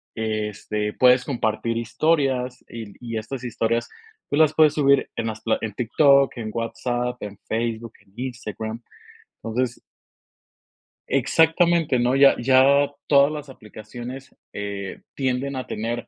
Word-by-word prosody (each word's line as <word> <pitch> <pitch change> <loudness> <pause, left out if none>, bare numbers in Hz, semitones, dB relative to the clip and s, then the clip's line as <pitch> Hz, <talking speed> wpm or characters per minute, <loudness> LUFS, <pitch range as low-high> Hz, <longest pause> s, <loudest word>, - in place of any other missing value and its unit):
este, 105 -1 -3
puedes 125 0 +4
compartir 115 -3 -1
historias. 130 0 0
Y 115 -1 -7
l 105 -2 -12
y 115 -2 -4
estas 125 +3 -6
historias 115 0 -1 0.4
tú 145 - 0
las 155 -1 +5
puedes 155 -2 +5
subir 140 -2 +3
en 115 - -2
las 110 -1 -5
pla 115 - +1
en 110 -2 -4
TikTok, 140 +4 +3
en 110 -2 -5
WhatsApp, 120 +1 -2
en 100 -1 -7
Facebook, 115 0 -3
en 95 - -29
Instagram, 115 -3 -5 0.6
entonces 120 +2 -2 1.3
Exactamente, 165 +2 +3
¿no? 125 +2 +2
Ya 135 0 +6
ya 135 +3 +5 0.2
todas 140 0 +5
las 150 -2 -7
aplicaciones, 120 +3 -10 0.2
eh, 100 -1 -5
tienden 135 +1 -1
a 130 - -5
tener 115 +2 -4
120 Hz, 135 wpm, -23 LUFS, 110-135 Hz, 1.3 s, Ya